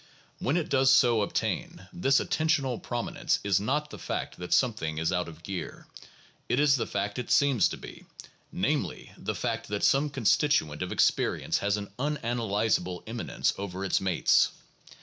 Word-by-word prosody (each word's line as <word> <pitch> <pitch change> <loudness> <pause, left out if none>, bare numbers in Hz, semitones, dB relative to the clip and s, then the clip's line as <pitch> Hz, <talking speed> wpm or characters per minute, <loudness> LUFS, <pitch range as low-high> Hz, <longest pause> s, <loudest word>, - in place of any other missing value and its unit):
When 145 +6 0
it 170 - -1
does 135 -1 +4
so 125 -4 +5
ob 100 - -2
tain, 170 +10 -3
this 140 -6 +3
attentional 150 -6 0
prominence 120 -1 -1
is 100 -1 +2
not 150 +8 -1
the - - -9
fact - - -4
that 90 0 -7
something 95 -12 +1
is 80 +1 0
out 90 0 0
of 85 0 -12
gear; 95 -1 -6 0.6
it 125 - +2
is 145 -1 +5
the 125 - -2
fact 105 +3 -2
it 125 - -5
seems 140 -6 +4
to - - -6
be, - - -11 0.5
namely - - -2
the - - -4
fact 115 -2 -3
that 105 0 -3
some 140 +2 +3
constituent 135 - +1
of 90 - -3
experience - - +1
has 100 +1 0
an 100 -1 -7
unanalyzable 115 -9 -1
eminence 115 +1 -1
over 95 -1 -4
its 95 - +1
mates. 95 -3 +3
115 Hz, 170 wpm, -28 LUFS, 100-140 Hz, 0.6 s, so